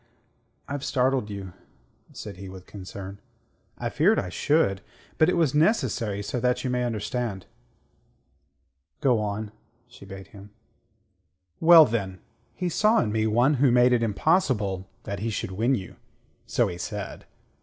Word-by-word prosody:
I've 145 -1 -4
startled 130 -5 +1
you," 100 -3 -7 0.6
said 100 -3 -9
he, 95 0 -8
with 95 -1 -11
concern. 100 0 -9 0.6
"I - - -3
feared - - +3
I 90 - -1
should. 100 - +1 0.4
But 155 - +5
it - - +1
was 160 -5 +2
necessary 130 - +1
so 125 +5 -3
that 125 +1 0
you 130 - -1
may 125 0 0
understand." 110 -3 -3 1.5
"Go 125 -4 +3
on," 105 0 -3 0.4
she 120 -4 -15
bade 95 0 -10
him. 100 0 -13 1.1
"Well, 165 -1 +9
then: 95 -6 -3 0.4
he 180 - -2
saw 215 +6 +3
in 105 - 0
me 110 0 +1
one 120 +7 +3
who 140 - +6
made 125 +1 +5
it 120 - +2
impossible 105 - +1
that 100 -1 -5
he 115 +3 -2
should 95 -3 -3
win 115 +8 +1
you 95 -6 -7 0.5
so - - +2
he 85 - -6
said. - - -6
110 Hz, 150 wpm, -26 LUFS, 100-130 Hz, 1.5 s, Well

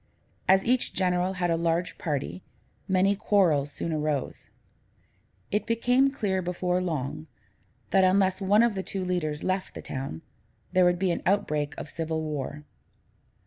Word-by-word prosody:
As 190 +1 +5
each 250 +1 +1
general 180 0 +1
had 175 -2 0
a - - +3
large 170 +1 -1
party, 155 +1 -3 0.5
many 190 +1 +3
quarrels 170 -9 +2
soon 165 +2 -3
arose. 150 -3 -2 1.0
It 210 - 0
became 245 +4 +3
clear 205 -9 -1
before 180 0 -1
long, 155 -2 -3 0.6
that, 190 - +5
unless 190 +1 +3
one 205 +4 +4
of 235 -2 +2
the 190 - -2
two 190 0 -4
leaders 155 -5 -2
left 185 0 -2
the - - -6
town, 130 - -5 0.5
there 185 0 +4
would 175 0 +3
be 185 0 +1
an - - -2
outbreak 150 -7 0
of - - -6
civil 160 +1 -3
war. 150 -1 -4
180 Hz, 150 wpm, -27 LUFS, 155-195 Hz, 1.0 s, As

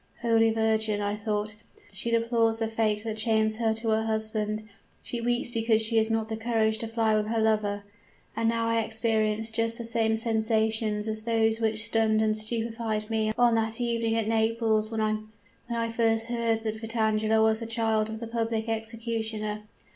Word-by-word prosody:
"'Holy 225 -1 +4
Virgin!' 220 -1 +1
I 205 0 -1
thought, 210 0 -2 0.4
'she 215 +4 -2
deplores 230 -1 +2
the 225 0 -1
fate 220 -1 0
that 220 -1 -4
chains 220 0 +1
her 225 -1 +1
to 225 0 -2
her 220 0 +2
husband! 215 -1 -2 0.4
she 240 - -4
weeps 240 +1 0
because 225 -2 +2
she 225 +1 +1
has 220 0 +3
not 220 0 -1
courage 220 -1 +1
to 225 - -2
fly 225 -1 +1
with 210 0 0
her 225 +1 0
lover!' 210 -2 +1 0.5
and 225 +1 +1
now 230 0 0
I 230 0 +2
experienced 220 0 0
just 230 0 0
the 235 - -6
same 225 -1 +1
sensations 220 -1 0
as 220 0 -2
those 225 0 +1
which 220 0 0
stunned 220 -1 +2
and 215 0 +2
stupefied 225 0 -3
me 220 -1 +1
on 240 -1 +4
that 225 0 0
evening 230 -2 0
at 225 -2 0
Naples 220 -1 +2
when 220 -1 -1 0.7
I 230 -1 -1
first 225 0 +1
heard 230 -2 0
that 220 0 -3
Vitangela 220 -1 +1
was 220 0 +3
the 230 - -5
child 225 -1 0
of 220 0 -5
the 230 - -5
public 225 -1 -2
executioner. 225 -1 -3
225 Hz, 175 wpm, -27 LUFS, 220-230 Hz, 0.7 s, Holy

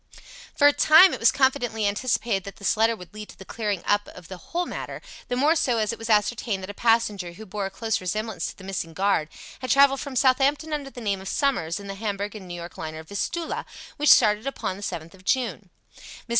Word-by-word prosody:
For 290 - +3
a 290 - +7
time 320 +7 +7
it - - -4
was 230 -1 +5
confidently 245 -5 +1
anticipated 205 -2 0
that 200 - -8
this 200 - 0
letter 225 +1 +3
would 180 -1 -13
lead 210 0 -9
to - - -14
the 190 - -12
clearing 205 -5 -3
up 205 0 +1
of 170 - -13
the 190 - -7
whole 345 - -3
matter, - - -6 0.3
the 245 - -2
more 290 +6 +3
so 250 -6 +1
as 215 0 0
it - - -9
was 225 0 -6
ascertained 210 -1 +1
that 190 - -5
a - - -12
passenger 210 -6 +1
who 220 +5 -11
bore 200 0 -3
a - - -7
close 220 +2 -2
resemblance 195 0 -3
to - - -9
the 195 - -13
missing 180 -4 -5
guard 190 -5 +1 0.3
had 255 -1 -6
travelled 275 0 +5
from 280 -2 -6
Southampton 275 +4 +2
under 285 -2 -3
the 250 - -10
name 200 -3 -1
of 190 - -9
Summers 205 - 0
in 200 - -10
the 195 - -5
Hamburg 205 0 -4
and 200 -4 -9
New 175 - -6
York 170 0 -9
liner 155 0 -6
Vistula, 260 - -3 0.3
which 295 -1 +2
started 215 +1 +5
upon 265 -8 -3
the 200 - -11
7th 170 -4 -5
of 190 -1 -18
June. 215 -4 -1 0.3
Mrs. - - -15
215 Hz, 235 wpm, -25 LUFS, 195-255 Hz, 0.3 s, a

